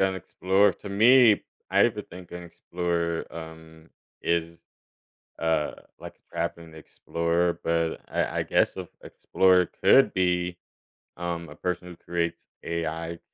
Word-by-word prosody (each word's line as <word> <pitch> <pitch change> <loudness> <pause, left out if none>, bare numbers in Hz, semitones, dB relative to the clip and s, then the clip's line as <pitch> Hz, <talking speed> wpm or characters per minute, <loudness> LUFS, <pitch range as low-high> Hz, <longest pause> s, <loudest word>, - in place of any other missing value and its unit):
an 95 0 +2
explorer, 95 +3 +2
to - - -11
me, 115 +2 +6 0.3
I 95 - +2
have 110 +2 +5
to 105 - -5
think, 90 -2 -13
an 90 - -6
explorer, 85 -1 -3
um, 80 0 -11 0.3
is, 85 0 -1 0.7
uh, 80 -2 0 0.3
like - - -10
a - - -27
traveling 85 -1 -4
explorer, 85 +2 -1
but 85 -1 0
I - - -1
I - - +1
guess, - - +1
a - - -4
an - - -13 0.2
explorer 90 -1 +3 0.2
could 130 +8 +6
be 90 -1 0 0.6
um, 85 -1 -4
a 75 - -12
person 90 +1 -3
who 90 - -9
creates 85 0 -3 0.2
AI 85 0 -3
85 Hz, 145 wpm, -26 LUFS, 85-90 Hz, 0.7 s, me